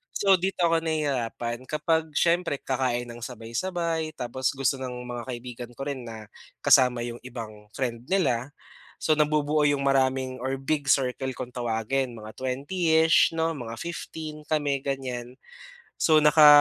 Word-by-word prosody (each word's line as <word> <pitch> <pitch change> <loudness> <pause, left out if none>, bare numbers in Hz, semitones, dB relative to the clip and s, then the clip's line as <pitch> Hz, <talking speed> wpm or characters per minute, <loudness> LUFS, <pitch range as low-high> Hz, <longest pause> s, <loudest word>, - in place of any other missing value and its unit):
So, 195 -2 +5
dito 190 +1 -2
ako 165 0 +2
nahihirapan 130 -6 -2
kapag 155 +1 0
siyempre 170 -2 +1
kakain 125 -2 -1
nang 120 0 -7
sabay, 115 -2 -9
sabay 165 -3 -1
tapos 130 +2 -2
gusto 135 0 0
ng 125 -1 -5
mga 120 -1 -4
kaibigan 120 -1 -7
ko 135 - -9
rin 130 -4 -5
na 110 -2 -9 0.3
kasama 125 -2 +5
yung 120 0 -5
ibang 110 -4 -8
friend 120 -2 -3
nila 145 -8 +1 0.5
so, 155 -1 +2
nabubuo 150 0 +2
yung 145 -1 +1
maraming 130 -1 +1
or 130 +2 -2
big 145 +1 -1
circle 130 0 +1
kung 125 -1 -6
tawagin 120 +2 -1
mga 110 0 -9
20-ish 160 +6 +3
'no, 165 0 +1
mga 115 -3 -6
15 155 -3 -6
kami 145 -3 +1
ganyan. 125 -3 -4 0.6
So, 155 -1 +4
naka 150 0 +7
135 Hz, 150 wpm, -26 LUFS, 120-155 Hz, 0.6 s, naka